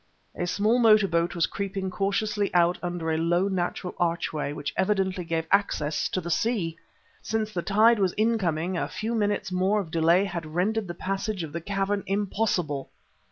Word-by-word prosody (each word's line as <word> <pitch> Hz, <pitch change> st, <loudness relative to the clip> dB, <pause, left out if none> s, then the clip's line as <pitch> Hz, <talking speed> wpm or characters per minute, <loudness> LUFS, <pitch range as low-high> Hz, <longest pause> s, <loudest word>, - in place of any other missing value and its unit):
A 175 Hz, -, -2 dB
small 215 Hz, +6 st, +2 dB
motor 215 Hz, -3 st, +6 dB
boat 170 Hz, 0 st, 0 dB
was 170 Hz, -, +3 dB
creeping 195 Hz, -1 st, -4 dB
cautiously 200 Hz, +1 st, 0 dB
out 175 Hz, 0 st, +3 dB
under 175 Hz, -2 st, -2 dB
a 160 Hz, -, 0 dB
low, 175 Hz, +3 st, +2 dB
natural 180 Hz, -1 st, -2 dB
archway 165 Hz, -4 st, -1 dB
which 145 Hz, 0 st, -5 dB
evidently 190 Hz, -2 st, 0 dB
gave 165 Hz, -1 st, -2 dB
access 175 Hz, -7 st, +1 dB
to -, -, -1 dB
the 170 Hz, -1 st, -5 dB
sea! 185 Hz, -5 st, 0 dB, 0.5 s
Since 215 Hz, -1 st, -2 dB
the 175 Hz, -, -1 dB
tide 215 Hz, +4 st, +4 dB
was 190 Hz, -3 st, +1 dB
incoming, 185 Hz, -6 st, 0 dB
a -, -, -1 dB
few 225 Hz, +2 st, -4 dB
minutes 205 Hz, -3 st, 0 dB
more 190 Hz, +3 st, +2 dB
of 175 Hz, -6 st, -5 dB
delay 170 Hz, +4 st, +3 dB
had 170 Hz, -4 st, -6 dB
rendered 210 Hz, +3 st, 0 dB
the 175 Hz, -, -6 dB
passage 195 Hz, +1 st, -3 dB
of 150 Hz, -2 st, -7 dB
the 170 Hz, -, -3 dB
cavern 200 Hz, +2 st, -1 dB
impossible.... 190 Hz, -7 st, -1 dB
185 Hz, 175 wpm, -26 LUFS, 170-205 Hz, 0.5 s, motor